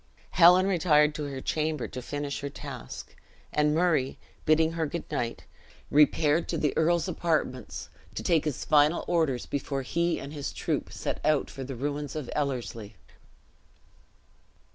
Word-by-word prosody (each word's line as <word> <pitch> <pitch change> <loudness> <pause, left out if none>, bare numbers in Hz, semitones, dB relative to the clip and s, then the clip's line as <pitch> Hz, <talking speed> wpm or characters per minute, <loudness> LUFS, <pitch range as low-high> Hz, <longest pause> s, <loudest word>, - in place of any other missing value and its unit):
Helen 180 +2 +7
retired 155 -5 +4
to 150 -1 -4
her 135 -2 -5
chamber 155 -3 -1
to 125 - -7
finish 145 +2 -4
her 140 - -3
task; 140 -4 -8 0.4
and 150 0 +2
Murray, 160 -6 +2 0.3
bidding 160 +1 +4
her 165 -1 -1
good 170 +3 -4
night, 120 -5 -3 0.5
repaired 150 +2 +4
to - - -1
the 150 - 0
earl's 170 +2 +2
apartments, 155 - -2 0.3
to - - -4
take 165 -3 +2
his 150 -4 -2
final 150 +2 +4
orders 160 -8 +1
before 140 -1 -3
he 170 +6 0
and 140 +2 -7
his 145 -2 -4
troop - - -2
set - - -4
out 150 -1 +2
for 135 - -6
the 135 0 -6
ruins 145 +2 -3
of 150 -5 -4
Ellerslie. 115 -7 -3
150 Hz, 150 wpm, -28 LUFS, 135-160 Hz, 0.5 s, Helen